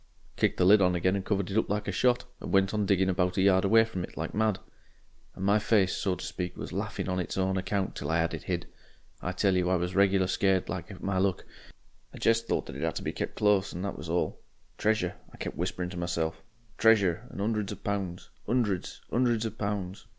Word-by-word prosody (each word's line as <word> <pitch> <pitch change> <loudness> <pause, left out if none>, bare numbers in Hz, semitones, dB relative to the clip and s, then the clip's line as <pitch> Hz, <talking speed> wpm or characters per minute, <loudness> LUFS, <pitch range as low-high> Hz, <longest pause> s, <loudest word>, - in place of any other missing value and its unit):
"Kicked - - +1
the 90 - +3
lid 100 +2 +7
on 90 -1 +3
again 95 +2 +2
and 100 - -2
covered 100 -1 -1
it 100 - 0
up - - -2
like 105 +1 -1
a - - 0
shot, 125 +6 +2
and - - -6
went 95 +1 +3
on 105 -2 0
digging 95 -1 +3
about 90 0 +1
a - - +3
yard 95 -1 +5
away 115 +3 +5
from 95 -5 -4
it - - -9
like 80 0 -3
mad. 110 -1 +1 0.8
And 95 - -4
my 100 +2 +4
face, 105 -3 +2
so 95 -2 0
to - - -7
speak, 90 -1 -4
was - - -6
laughing - - -3
on 90 -1 -1
its 90 - -3
own 95 0 +1
account 95 +1 -1
till 75 - -4
I 80 - +2
had 85 0 0
it 80 - -4
hid. 90 -2 -3 0.6
I 90 - -2
tell 95 +1 +2
you 90 -1 +2
I 95 - +3
was 90 +1 -1
regular 95 -1 +4
scared 95 0 +1
like 85 +3 -4
at 95 - -10
my 95 -1 0
luck. 95 -1 0 0.7
I - - -9
jest 115 0 +2
thought - - 0
that - - -8
it 70 - -5
'ad 80 -2 -1
to - - -4
be - - -2
kep' - - -4
close 105 -2 +2
and 90 +3 -4
that 100 - -3
was 75 +2 -8
all. 85 +1 -1 0.4
'Treasure,' 105 -5 +1 0.2
I - - -12
kep' - - -4
whisperin' 90 0 -3
to 90 - -7
myself, 85 -2 -2 0.4
'Treasure' 110 -1 +4
and - - -9
''undreds 105 -1 -1
of 105 - -8
pounds, 95 -4 -3 0.2
'undreds, 110 -7 -1
'undreds 120 -2 +2
of 110 0 -5
pounds.' 100 -2 -3
95 Hz, 240 wpm, -29 LUFS, 90-105 Hz, 0.8 s, lid